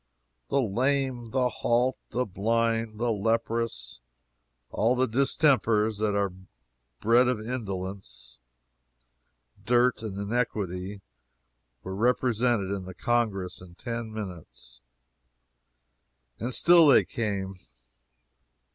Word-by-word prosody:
The 140 Hz, -, +2 dB
lame, 130 Hz, +1 st, 0 dB
the 125 Hz, +2 st, +1 dB
halt, 125 Hz, +1 st, +1 dB
the 125 Hz, +1 st, -1 dB
blind, 115 Hz, +2 st, 0 dB
the 120 Hz, 0 st, +1 dB
leprous 115 Hz, -, -1 dB, 0.7 s
all 115 Hz, +4 st, +2 dB
the 130 Hz, +1 st, +3 dB
distempers 115 Hz, -4 st, +2 dB
that 105 Hz, -1 st, +1 dB
are 100 Hz, -2 st, 0 dB, 0.7 s
bred 120 Hz, +3 st, +4 dB
of 125 Hz, -3 st, 0 dB
indolence, 95 Hz, -, -6 dB, 1.2 s
dirt, 120 Hz, +1 st, +3 dB
and 105 Hz, -3 st, -5 dB
iniquity 100 Hz, -3 st, -2 dB, 0.8 s
were 95 Hz, -, -5 dB
represented 120 Hz, -1 st, +1 dB
in 100 Hz, -2 st, -3 dB
the 95 Hz, -1 st, -9 dB
Congress 100 Hz, -7 st, -1 dB
in 90 Hz, -1 st, -14 dB
ten 115 Hz, +2 st, -5 dB
minutes, 95 Hz, -, -8 dB, 1.6 s
and 120 Hz, +4 st, -3 dB
still 170 Hz, +4 st, +6 dB
they 140 Hz, -, +6 dB
came! 100 Hz, -4 st, -3 dB
115 Hz, 100 wpm, -27 LUFS, 100-125 Hz, 1.6 s, still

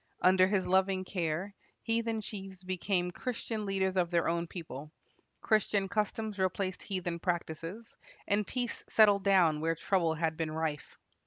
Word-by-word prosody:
Under 185 Hz, 0 st, +6 dB
his 195 Hz, -1 st, +1 dB
loving 190 Hz, 0 st, +2 dB
care, 180 Hz, +1 st, -2 dB, 0.3 s
heathen 225 Hz, -1 st, 0 dB
chiefs 195 Hz, -3 st, -8 dB
became 185 Hz, -1 st, -1 dB
Christian 225 Hz, 0 st, -4 dB
leaders 190 Hz, -1 st, 0 dB
of 175 Hz, -2 st, +2 dB
their 170 Hz, -1 st, +2 dB
own 170 Hz, 0 st, 0 dB
people; 155 Hz, -4 st, -8 dB, 0.5 s
Christian 210 Hz, -2 st, +2 dB
customs 215 Hz, 0 st, -2 dB
replaced 185 Hz, 0 st, -1 dB
heathen 180 Hz, -4 st, -3 dB
practises; 175 Hz, +5 st, -4 dB, 0.3 s
and 205 Hz, 0 st, +1 dB
peace 245 Hz, -2 st, -3 dB
settled 205 Hz, -3 st, +5 dB
down 175 Hz, -6 st, +4 dB
where 165 Hz, +1 st, +1 dB
trouble 165 Hz, -1 st, +1 dB
had 160 Hz, -1 st, -1 dB
been 160 Hz, -1 st, -1 dB
rife. 155 Hz, -1 st, -3 dB
185 Hz, 145 wpm, -31 LUFS, 170-205 Hz, 0.5 s, Under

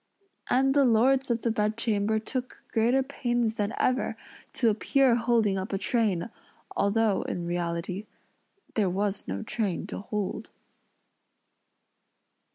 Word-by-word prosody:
And 270 Hz, +1 st, +3 dB
the 285 Hz, 0 st, +5 dB
lords 260 Hz, +3 st, +3 dB
of 235 Hz, -1 st, 0 dB
the 230 Hz, -, +2 dB
bedchamber 215 Hz, 0 st, 0 dB
took 250 Hz, +3 st, -5 dB
greater 240 Hz, +4 st, +3 dB
pains 240 Hz, -4 st, -1 dB
than 205 Hz, -1 st, -1 dB
ever, 255 Hz, +1 st, +1 dB, 0.4 s
to 230 Hz, -3 st, +3 dB
appear 260 Hz, +4 st, +3 dB
holding 230 Hz, -4 st, +2 dB
up 190 Hz, -, -5 dB
a -, -, +1 dB
train, 210 Hz, -1 st, 0 dB, 0.4 s
although, 205 Hz, 0 st, +2 dB
in 175 Hz, -, -4 dB
reality, 175 Hz, +3 st, -3 dB, 0.7 s
there 210 Hz, -6 st, +2 dB
was 195 Hz, +2 st, -1 dB
no 95 Hz, +1 st, -3 dB
train 200 Hz, -7 st, -2 dB
to -, -, -6 dB
hold. 205 Hz, 0 st, -4 dB
220 Hz, 125 wpm, -28 LUFS, 200-240 Hz, 0.7 s, the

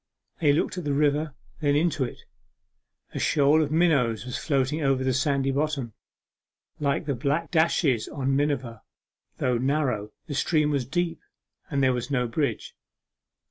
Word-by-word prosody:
They 150 Hz, -5 st, +4 dB
looked 160 Hz, +5 st, 0 dB
at -, -, -6 dB
the 145 Hz, -2 st, -1 dB
river, 150 Hz, 0 st, +1 dB, 0.2 s
then 145 Hz, -2 st, +2 dB
into 155 Hz, -2 st, +1 dB
it; 125 Hz, -, -6 dB, 0.9 s
a -, -, -3 dB
shoal 150 Hz, +1 st, +3 dB
of 150 Hz, -, 0 dB
minnows 140 Hz, -10 st, +2 dB
was 125 Hz, 0 st, -5 dB
floating 140 Hz, +1 st, 0 dB
over 135 Hz, -2 st, +1 dB
the 130 Hz, 0 st, +1 dB
sandy 135 Hz, +1 st, +1 dB
bottom, 140 Hz, -4 st, -1 dB, 0.9 s
like 145 Hz, +2 st, 0 dB
the 145 Hz, -, 0 dB
black 140 Hz, +6 st, -1 dB
dashes 160 Hz, -7 st, +2 dB
on 135 Hz, -1 st, -1 dB
miniver; 135 Hz, -5 st, -1 dB, 0.6 s
though 125 Hz, -2 st, +1 dB
narrow, 130 Hz, -6 st, 0 dB
the 155 Hz, -, -6 dB
stream 150 Hz, +1 st, +1 dB
was 135 Hz, -4 st, -1 dB
deep, 170 Hz, +3 st, -1 dB, 0.5 s
and 140 Hz, -2 st, 0 dB
there 130 Hz, -1 st, +4 dB
was 125 Hz, +2 st, -3 dB
no 125 Hz, -3 st, 0 dB
bridge. 115 Hz, 0 st, -2 dB
140 Hz, 155 wpm, -26 LUFS, 130-155 Hz, 0.9 s, They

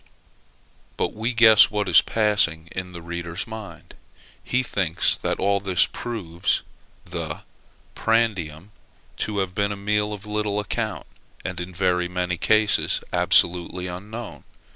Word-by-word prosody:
But -, -, -1 dB
we 110 Hz, +3 st, -2 dB
guess 110 Hz, -2 st, +7 dB
what 105 Hz, -1 st, -1 dB
is -, -, +7 dB
passing 105 Hz, -7 st, +1 dB
in 90 Hz, 0 st, -5 dB
the 85 Hz, -1 st, -9 dB
reader's 85 Hz, +2 st, -4 dB
mind. 110 Hz, -2 st, -9 dB, 0.5 s
He 125 Hz, +1 st, 0 dB
thinks 90 Hz, -8 st, +1 dB
that -, -, -1 dB
all 100 Hz, 0 st, +2 dB
this 95 Hz, -2 st, +3 dB
proves 100 Hz, -6 st, -2 dB, 0.4 s
the -, -, -5 dB, 0.5 s
prandium 105 Hz, -6 st, 0 dB, 0.5 s
to 105 Hz, -1 st, -2 dB
have 95 Hz, -2 st, -1 dB
been 100 Hz, +1 st, 0 dB
a 100 Hz, -, -4 dB
meal 105 Hz, +1 st, 0 dB
of 105 Hz, 0 st, -7 dB
little 105 Hz, -1 st, -1 dB
account; 110 Hz, 0 st, -3 dB, 0.4 s
and 90 Hz, -1 st, -4 dB
in 90 Hz, +1 st, -5 dB
very 90 Hz, -1 st, +1 dB
many 90 Hz, 0 st, -2 dB
cases 110 Hz, -1 st, +2 dB
absolutely 90 Hz, +1 st, +2 dB
unknown. 105 Hz, +6 st, -7 dB
100 Hz, 135 wpm, -24 LUFS, 90-105 Hz, 0.5 s, guess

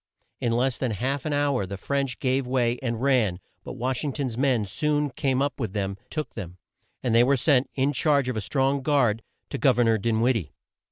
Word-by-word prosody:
In 120 Hz, -, 0 dB
less 125 Hz, +2 st, +1 dB
than 130 Hz, -, 0 dB
half 135 Hz, -, -2 dB
an -, -, -1 dB
hour 140 Hz, -8 st, +1 dB
the 100 Hz, +1 st, -5 dB
French 135 Hz, +4 st, -2 dB
gave 130 Hz, -1 st, 0 dB
way, 125 Hz, -1 st, +1 dB
and 115 Hz, -3 st, -2 dB
ran, 120 Hz, -10 st, +2 dB, 0.2 s
but -, -, -7 dB
Wash 130 Hz, +2 st, -2 dB
ing 145 Hz, -3 st, -2 dB
ton's 130 Hz, -5 st, -3 dB
men 125 Hz, -4 st, +1 dB
soon 150 Hz, +7 st, 0 dB
came 135 Hz, 0 st, 0 dB
up 140 Hz, -1 st, -3 dB
with 110 Hz, -7 st, -3 dB
them, 100 Hz, -2 st, -2 dB
took 155 Hz, -1 st, -4 dB
them, 90 Hz, -5 st, -7 dB, 0.5 s
and 125 Hz, -3 st, +1 dB
they 115 Hz, +1 st, +6 dB
were 135 Hz, +2 st, +3 dB
sent, 130 Hz, 0 st, +3 dB
in 135 Hz, +2 st, +1 dB
charge 140 Hz, -1 st, +2 dB
of 125 Hz, -, -2 dB
a 110 Hz, -, -1 dB
strong 135 Hz, +5 st, 0 dB
guard, 130 Hz, -6 st, +2 dB, 0.3 s
to -, -, -3 dB
Gov -, -, +4 dB
er 120 Hz, -, +4 dB
nor 115 Hz, -1 st, +3 dB
Din 110 Hz, +1 st, 0 dB
wid 125 Hz, +2 st, +3 dB
die. 90 Hz, -10 st, -3 dB
130 Hz, 225 wpm, -25 LUFS, 115-140 Hz, 0.5 s, they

